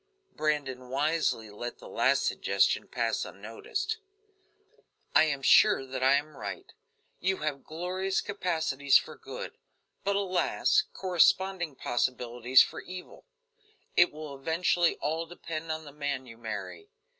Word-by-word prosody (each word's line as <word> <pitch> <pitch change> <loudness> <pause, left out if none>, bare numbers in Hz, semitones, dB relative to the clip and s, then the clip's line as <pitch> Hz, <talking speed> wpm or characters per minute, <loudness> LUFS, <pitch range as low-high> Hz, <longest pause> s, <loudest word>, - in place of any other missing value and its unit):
Brandon 135 -5 -2
wisely 140 -5 0
let 120 +4 -6
the - - -12
last - - +2
suggestion - - +1
pass - - -1
unnoticed. 435 -1 -4 1.2
"I 155 - +7
am 140 -3 -2
sure 205 -6 +6
that 130 0 -5
I 130 +1 +5
am 145 +1 0
right; 100 -7 -6 0.5
you 190 +1 +1
have 145 -3 -2
glorious 185 +4 -2
capacities 160 -8 +2
for - - -5
good, - - -8 0.4
but 200 0 +1
alas! 190 -2 +2
corresponding 185 -2 +2
possibilities 125 0 +3
for - - -6
evil. 185 - -10 0.7
It 175 - +6
will 150 -1 -8
eventually 165 +4 +1
all 160 +2 -2
depend 165 -2 -6
upon 160 0 -4
the 145 - -10
man 140 -2 -3
you 115 -2 -13
marry. 115 - -6
155 Hz, 130 wpm, -29 LUFS, 135-180 Hz, 1.2 s, I